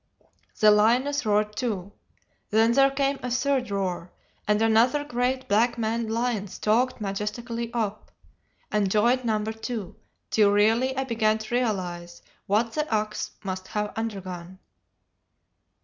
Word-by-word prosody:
The 215 Hz, -1 st, +7 dB
lioness 245 Hz, +6 st, +3 dB
roared 210 Hz, 0 st, +1 dB
too; 205 Hz, -6 st, -3 dB, 0.6 s
then 225 Hz, +2 st, +4 dB
there 275 Hz, +3 st, +5 dB
came 275 Hz, 0 st, 0 dB
a 250 Hz, -, -3 dB
third 255 Hz, 0 st, 0 dB
roar, 185 Hz, -3 st, -3 dB, 0.4 s
and 210 Hz, 0 st, +3 dB
another 225 Hz, +6 st, +3 dB
great 255 Hz, -1 st, -1 dB
black 230 Hz, +4 st, +2 dB
maned 225 Hz, 0 st, -1 dB
lion 230 Hz, -3 st, -1 dB
stalked 230 Hz, +7 st, 0 dB
majestically 225 Hz, +4 st, -4 dB
up, 215 Hz, -3 st, -3 dB, 0.6 s
and 205 Hz, -2 st, +1 dB
joined 235 Hz, +6 st, +2 dB
number 220 Hz, -1 st, 0 dB
two, 225 Hz, -4 st, -5 dB, 0.4 s
till 210 Hz, -2 st, +4 dB
really 225 Hz, +6 st, +2 dB
I 265 Hz, -, +1 dB
began 220 Hz, -4 st, +1 dB
to 220 Hz, +2 st, -7 dB
realize 180 Hz, -8 st, -2 dB, 0.2 s
what 220 Hz, +3 st, +1 dB
the 305 Hz, 0 st, -2 dB
ox 215 Hz, -1 st, -1 dB
must 185 Hz, -1 st, -5 dB
have 210 Hz, -1 st, -3 dB
undergone. 190 Hz, -5 st, -5 dB
220 Hz, 135 wpm, -26 LUFS, 210-245 Hz, 0.6 s, The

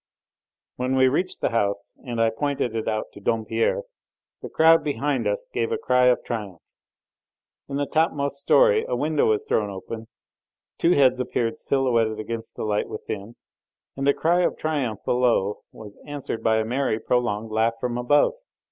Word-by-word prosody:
When 125 Hz, +1 st, -1 dB
we 130 Hz, 0 st, +5 dB
reached 180 Hz, +8 st, -1 dB
the -, -, +1 dB
house 100 Hz, -3 st, -1 dB
and 120 Hz, -2 st, -4 dB
I 115 Hz, 0 st, +3 dB
pointed 130 Hz, -1 st, -2 dB
it 110 Hz, -, -3 dB
out 110 Hz, -1 st, -2 dB
to -, -, -11 dB
Dompierre, 455 Hz, -, 0 dB, 0.6 s
the -, -, -7 dB
crowd 165 Hz, +1 st, +5 dB
behind 145 Hz, -1 st, -1 dB
us -, -, -2 dB
gave 450 Hz, -, -1 dB
a 450 Hz, -, 0 dB
cry 125 Hz, -, +3 dB
of 125 Hz, -, +3 dB
triumph. 105 Hz, -7 st, -5 dB, 1.1 s
In 140 Hz, -, -4 dB
the 145 Hz, 0 st, 0 dB
topmost 140 Hz, -3 st, 0 dB
storey 465 Hz, -, +4 dB
a -, -, -1 dB
window 155 Hz, -1 st, +1 dB
was 110 Hz, -1 st, +1 dB
thrown 105 Hz, -2 st, +1 dB
open, 110 Hz, +3 st, -7 dB, 0.7 s
two 170 Hz, -, +4 dB
heads 130 Hz, -4 st, +4 dB
appeared 115 Hz, -2 st, -1 dB
silhouetted 115 Hz, -5 st, +1 dB
against 115 Hz, +1 st, -6 dB
the -, -, -5 dB
light 105 Hz, -1 st, -1 dB
within, 105 Hz, +4 st, -6 dB, 0.6 s
and 135 Hz, +1 st, -2 dB
the 140 Hz, -, +5 dB
cry 175 Hz, +2 st, +2 dB
of -, -, 0 dB
triumph 140 Hz, -9 st, -2 dB
below 120 Hz, -5 st, +1 dB
was 105 Hz, -2 st, -12 dB
answered 145 Hz, -5 st, -5 dB
by 110 Hz, 0 st, +2 dB
a 110 Hz, -, 0 dB
merry, 125 Hz, -1 st, 0 dB
prolonged 115 Hz, -3 st, -1 dB
laugh 110 Hz, +1 st, +2 dB
from 120 Hz, 0 st, -2 dB
above. 145 Hz, +4 st, +3 dB
125 Hz, 170 wpm, -24 LUFS, 110-145 Hz, 1.1 s, we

